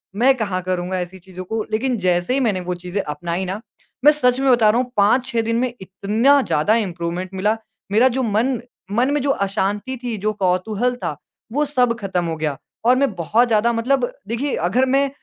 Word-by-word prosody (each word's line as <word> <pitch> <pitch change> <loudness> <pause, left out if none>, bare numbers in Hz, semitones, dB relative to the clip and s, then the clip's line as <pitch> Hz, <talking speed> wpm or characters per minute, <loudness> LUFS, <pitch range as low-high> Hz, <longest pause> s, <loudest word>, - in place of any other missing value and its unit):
मैं 260 +5 +4
कहाँ 195 -5 -2
करूँगा 185 0 -2
ऐसी 180 +1 -6
चीज़ों 185 0 -9
को, 220 +3 -2
लेकिन 245 +3 0
जैसे 175 +5 +1
ही 270 - +2
मैंने 215 -7 +1
वो 180 - 0
चीज़ें 180 +3 -2
अपनाई 170 +5 -3
ना, 195 +4 -4 0.4
मैं 300 - +10
सच 250 -4 +2
में 270 -1 +3
बता 230 -3 +5
रहा 235 +4 +3
हूँ 250 -1 -6
5-6 235 +4 +3
दिन 230 +1 -1
में 250 -1 -1
इतना 215 +9 +2
ज़्यादा 205 - +2
इंप्रूवमेंट 180 -3 -2
मिला। 205 +3 +1 0.4
मेरा 225 +5 +5
जो 260 - +1
मन 235 +3 0 0.4
मन 255 +4 +3
में 295 - +1
जो 280 - -1 0.2
अशांति 205 +5 -2
थी। 240 -2 -2
जो 215 - +2
कौतूहल 205 +7 +1
था, 150 - -4 0.3
वो 295 +5 +1
सब 250 -4 +1
ख़त्म 190 -3 -1
हो 165 -1 -2
गया। 150 -3 -2 0.3
और 250 +2 +6
मैं 275 -4 +1
बहुत 215 +8 +2
ज़्यादा 225 +1 +3
मतलब 245 +2 +1 0.2
देखिए 245 +5 -1
अगर 250 +7 +3
मैं 275 0 +3
220 Hz, 200 wpm, -20 LUFS, 185-250 Hz, 0.4 s, मैं